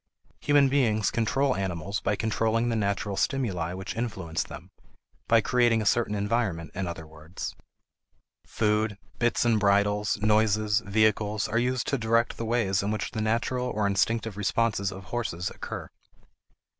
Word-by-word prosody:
Human 145 -1 +4
beings 115 -6 +2
control 130 +4 +1
animals 95 0 -3
by 105 - 0
controlling 115 +2 0
the 115 - 0
natural 100 -1 -1
stimuli 95 - -1
which 95 +2 -6
influence 95 -9 -3
them; - - -9 0.6
by 115 -1 +5
creating 120 -1 +3
a 110 - -2
certain 110 0 +2
environment 100 -6 -1
in 95 0 -3
other 85 -2 -6
words. 80 +2 -7 0.9
Food, 105 -1 0 0.2
bits 120 0 +2
and 115 -2 +3
bridles, 105 +1 +2
noises, 105 0 +3
vehicles, 110 -1 +1
are 115 +2 0
used 125 0 0
to 140 - 0
direct 115 +1 +1
the 115 - -3
ways 110 -5 +1
in 100 - -2
which 105 -3 -2
the 110 - -3
natural 120 +3 0
or 105 -4 -1
instinctive 105 +2 0
responses 105 -1 0
of 95 0 -9
horses 95 -4 -3
occur. - - -6
110 Hz, 150 wpm, -27 LUFS, 100-115 Hz, 0.9 s, by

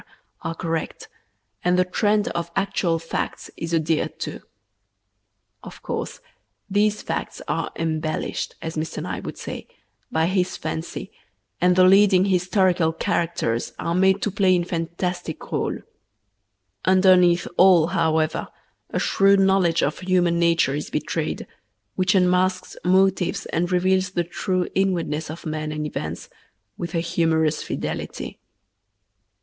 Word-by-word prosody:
are 165 - -4
correct, 165 -1 -4 0.6
and 180 0 +3
the 185 - +3
trend 210 +3 +1
of 170 0 -3
actual 195 -3 +1
facts 165 0 -4
is 165 0 -5
adhered 160 -1 0
to. - - -5 1.2
Of - - -12
course, - - -4 0.5
these 210 +1 +1
facts - - -4
are - - -2
"embellished," 155 -1 -2
as 160 0 -4
Mr. 155 +1 -3
Nye - - -4
would - - -7
say, - - -7 0.4
by 160 0 +2
his 185 0 0
fancy, 160 +2 -5 0.5
and 180 0 +4
the 185 - +6
leading 190 0 +6
historical 185 -3 +2
characters 165 -9 -1
are 170 - -2
made 190 +2 +3
to 210 - 0
play 190 -1 +3
in 175 - +1
fantastic 170 0 -3
rôles. - - -3 1.0
Underneath 185 -2 +5
all, 180 -3 +6
however, 160 -3 +1 0.4
a - - -3
shrewd 195 0 +4
knowledge 190 -4 +3
of 150 - -1
human 180 -2 +2
nature 170 -5 +3
is 150 +1 -4
betrayed, - - -2 0.5
which 185 +1 +1
unmasks 185 0 +2
motives 190 +1 +2
and 175 +2 0
reveals 185 +1 +2
the 175 -1 -1
true 180 +1 -2
inwardness 170 -6 0
of 160 +2 -8
men 155 -1 -3
and 150 0 -3
events 85 - -5 0.5
with 170 0 -5
a 165 - +2
humorous 160 -2 +1
fidelity. - - -5
180 Hz, 130 wpm, -23 LUFS, 165-185 Hz, 1.2 s, the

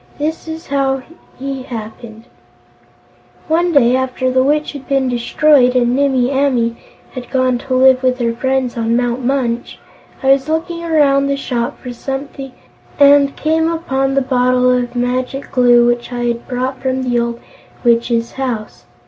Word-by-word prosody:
This 315 +3 -3
is 320 +1 -7
how 270 -1 -1 0.3
he 270 0 -5
happened: 225 -2 -9 1.2
"One 345 +2 +1
day, 255 -5 +4
after 255 0 -1
the 260 0 +3
Witch 300 +3 +1
had 285 -3 -10
been 270 -1 +1
destroyed 250 +2 +3
and 245 0 +2
Nimmie 265 -2 +1
Amee 255 -4 +1 0.4
had 250 -1 -8
gone 255 -2 +1
to 260 0 -3
live 260 0 +5
with 255 -1 +1
her 235 -2 -1
friends 260 +1 -1
on 230 0 0
Mount 245 +1 -1
Munch, 245 -2 -2 0.5
I 270 - +4
was 275 +2 +2
looking 335 +2 -2
around 285 -4 +2
the 280 0 -1
shop 245 -3 -3
for 250 -1 -7
something 270 +1 -6 0.5
and 280 -1 +5
came 320 +1 0
upon 270 -5 -1
the 275 - +3
bottle 250 -1 +2
of 250 -1 -1
Magic 250 +2 -2
Glue 245 -2 +4
which 240 +1 -1
I 240 0 -3
had 235 0 -2
brought 255 +1 -3
from 260 0 -1
the 245 -1 0
old 235 0 -2 0.4
Witch's 235 -1 +1
house. 245 -5 -5
260 Hz, 160 wpm, -16 LUFS, 245-275 Hz, 1.2 s, live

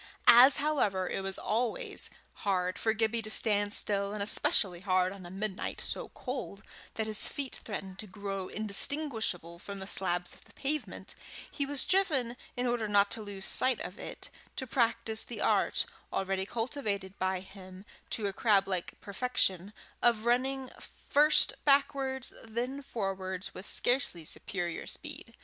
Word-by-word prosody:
As, 255 +3 +9
however, 210 -11 +1
it - - -2
was 195 0 -3
always 230 +2 0 0.3
hard 185 -2 0
for 220 - +2
Gibbie 225 +1 +1
to 215 - -5
stand 205 -2 +3
still, 200 -1 +2
and 210 -1 -1
especially 190 -3 +3
hard 185 -1 +2
on 190 -3 -10
a - - -9
midnight 195 +1 -4
so - - -4
cold 250 -6 -5 0.3
that 220 - -1
his 215 -1 +2
feet 275 -3 -4
threatened 195 -3 -6
to 215 - -6
grow 195 -1 -5
indistinguishable 215 - 0
from 200 +2 -7
the 190 - -6
slabs 180 -2 +1
of - - -17
the - - -19
pavement, 295 +2 -2 0.4
he 280 - -2
was 285 -1 +1
driven, 290 -11 +2 0.2
in 245 - 0
order 240 -3 0
not 205 -1 +4
to 225 - 0
lose 200 -2 -4
sight 255 -2 +2
of 185 - -7
it, - - -5 0.2
to 260 - -3
practise 230 -2 +2
the - - -7
art, - - +2 0.3
already 190 0 -1
cultivated 215 -6 -2
by 185 0 0
him 190 0 -12 0.2
to 215 - -2
a 200 - -1
crab 200 -2 +3
like 185 -3 -3
perfection, 200 -3 0 0.3
of 230 -2 +3
running 260 +2 +1 0.4
first 300 +2 +5
backwards, 275 -2 +2
then 245 +5 -3
forwards 195 -6 -4
with 190 - -8
scarcely 245 - +2
superior 175 +1 -4
speed. 295 -6 -6
215 Hz, 155 wpm, -31 LUFS, 190-250 Hz, 0.4 s, As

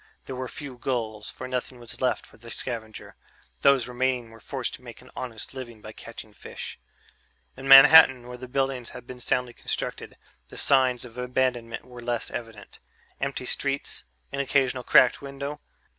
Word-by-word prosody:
There 130 - -6
were 130 0 -4
few 130 0 -8
gulls, 110 -5 -2
for 130 - -7
nothing 125 0 -3
was 120 -1 -9
left 125 -1 +1
for - - -19
the 115 +1 -12
scavenger; 115 -3 -5 0.5
those 135 -4 +5
remaining 125 -1 -1
were 115 - -14
forced - - -3
to - - -9
make - - -11
an - - -17
honest 120 -2 -6
living 120 -4 -8
by 105 0 -10
catching 110 -1 -10
fish. - - -8 0.8
In 135 +1 -8
Manhattan, 135 -2 +9
where 125 - -7
the 125 +1 -9
buildings 135 -2 -1
had 125 - -10
been 125 0 -9
more - - -11
soundly 125 0 0
constructed, - - -4 0.3
the - - -11
signs 130 -3 +3
of 120 0 -10
abandonment 125 -2 -1
were 125 -1 -11
less 120 -1 -2
evident... 115 -3 -8 0.4
empty - - -3
streets, - - -1 0.3
an 140 - -4
occasional 135 -2 +1
cracked 125 0 +5
window. 140 +1 -6
125 Hz, 175 wpm, -26 LUFS, 120-130 Hz, 0.8 s, Manhattan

